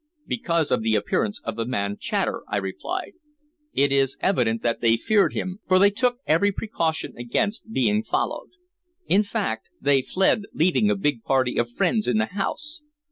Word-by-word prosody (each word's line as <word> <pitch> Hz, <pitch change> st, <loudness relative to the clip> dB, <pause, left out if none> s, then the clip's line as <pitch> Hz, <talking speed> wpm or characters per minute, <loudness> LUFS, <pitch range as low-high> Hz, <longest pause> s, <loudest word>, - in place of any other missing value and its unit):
"Because 170 Hz, -8 st, -1 dB
of -, -, +2 dB
the 110 Hz, 0 st, +1 dB
appearance 105 Hz, -1 st, -1 dB
of 115 Hz, -, -4 dB
the 115 Hz, -, -2 dB
man 100 Hz, -5 st, -1 dB
Chater," -, -, -1 dB
I -, -, -1 dB
replied. 100 Hz, -, -4 dB, 0.6 s
"It 140 Hz, 0 st, +2 dB
is 135 Hz, -1 st, +2 dB
evident 115 Hz, -, +1 dB
that 115 Hz, -1 st, 0 dB
they 115 Hz, -1 st, +4 dB
feared 205 Hz, -, +2 dB
him, 185 Hz, +2 st, -4 dB
for 185 Hz, -, +5 dB
they 200 Hz, +2 st, +5 dB
took 245 Hz, +3 st, +1 dB
every 170 Hz, +6 st, +3 dB
precaution 170 Hz, -6 st, -2 dB
against 205 Hz, -, -2 dB
being 210 Hz, -, +2 dB
followed. -, -, -2 dB, 0.6 s
In 200 Hz, -, +4 dB
fact, 115 Hz, -, -3 dB
they 140 Hz, -1 st, +3 dB
fled 190 Hz, +7 st, +1 dB
leaving 185 Hz, +6 st, +3 dB
a 210 Hz, -, +2 dB
big 145 Hz, -, -1 dB
party 130 Hz, -2 st, +1 dB
of 120 Hz, 0 st, 0 dB
friends 215 Hz, -, 0 dB
in -, -, +2 dB
the 225 Hz, -, +2 dB
house. 300 Hz, -, -4 dB
165 Hz, 175 wpm, -24 LUFS, -, 0.6 s, for